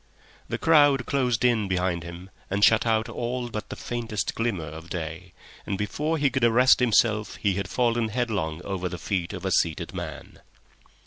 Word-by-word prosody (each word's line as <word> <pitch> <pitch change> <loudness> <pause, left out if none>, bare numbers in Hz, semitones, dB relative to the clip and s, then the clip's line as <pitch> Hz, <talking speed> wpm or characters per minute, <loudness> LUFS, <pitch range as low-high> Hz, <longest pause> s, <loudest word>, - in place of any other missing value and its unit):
The - - -2
crowd 145 -5 +4
closed 125 -4 +1
in 115 -4 +2
behind 90 -2 0
him 85 +3 -10 0.2
and 100 +1 0
shut 110 +2 +5
out 110 0 +2
all 120 0 -3
but 105 - -5
the - - -5
faintest 115 -4 -3
glimmer 115 -8 -2
of 80 +3 -9
day, 85 +1 -6 0.3
and 100 - -3
before 150 +11 -1
he 140 -3 +2
could 130 0 -1
arrest 120 +2 +5
himself 110 -3 +2
he 100 -2 0
had 100 +1 -3
fallen 120 -2 +1
headlong 105 -9 -2
over 95 -2 -3
the 90 - -6
feet 90 -3 -2
of - - -7
a - - 0
seated 80 -2 0
man. - - -7
110 Hz, 180 wpm, -26 LUFS, 90-120 Hz, 0.3 s, shut